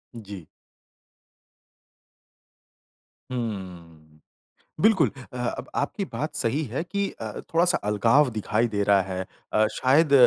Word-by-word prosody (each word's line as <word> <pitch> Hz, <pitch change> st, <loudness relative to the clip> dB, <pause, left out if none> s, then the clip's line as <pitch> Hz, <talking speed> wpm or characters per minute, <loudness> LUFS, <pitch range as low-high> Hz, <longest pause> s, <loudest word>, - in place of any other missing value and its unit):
जी। 100 Hz, -6 st, -8 dB, 2.9 s
हम्म। 85 Hz, -9 st, -6 dB, 0.6 s
बिल्कुल 190 Hz, -, +5 dB, 0.2 s
अ, -, -, -7 dB
अब 125 Hz, -1 st, -3 dB
आपकी 195 Hz, +7 st, -1 dB
बात 145 Hz, +7 st, -3 dB
सही 135 Hz, +6 st, 0 dB
है 130 Hz, +6 st, -3 dB
कि 200 Hz, +2 st, -1 dB
अ, 110 Hz, -1 st, -4 dB, 0.2 s
थोड़ा-सा 175 Hz, +2 st, +4 dB
अलगाव 115 Hz, +7 st, +4 dB
दिखाई 110 Hz, +1 st, 0 dB
दे 100 Hz, -, +2 dB
रहा 100 Hz, -1 st, +5 dB
है। 95 Hz, 0 st, -4 dB, 0.3 s
अ, 110 Hz, 0 st, +4 dB
शायद 140 Hz, +3 st, +3 dB
115 Hz, 110 wpm, -26 LUFS, 100-145 Hz, 2.9 s, बिल्कुल